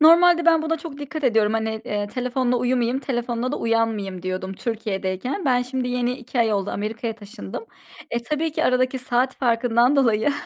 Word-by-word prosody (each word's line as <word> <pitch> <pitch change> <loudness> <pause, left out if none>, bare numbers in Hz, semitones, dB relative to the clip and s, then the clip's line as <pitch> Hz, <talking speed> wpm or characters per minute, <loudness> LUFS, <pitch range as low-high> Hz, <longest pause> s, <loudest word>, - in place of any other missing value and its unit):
Normalde 340 +2 +6
ben 325 -2 +5
buna 325 0 -1
çok 310 -3 -8
dikkat 290 +1 -5
ediyorum. 220 -4 +3
Hani, 220 0 -1
eee, 205 -3 -2
telefonla 250 +1 0
uyumıyım, 245 0 +1
telefonla 245 -1 -2
da - - -1
uyanmayım 220 -5 0
diyordum 185 0 -3
Türkiye'deyken. 215 - -3
Ben 250 -3 +3
şimdi, 255 0 -3
yeni 245 0 0
2 250 0 -6
ay 225 -2 +3
oldu 200 -1 0
Amerika'ya 225 +2 -3
taşındım. 205 - -8 0.5
E, 235 - -1
tabii 305 +5 -1
ki - - 0
aradaki 255 +1 +2
saat 255 +1 0
farkından 240 +1 +3
dolayı, 235 0 +3
245 Hz, 170 wpm, -23 LUFS, 220-265 Hz, 0.5 s, Normalde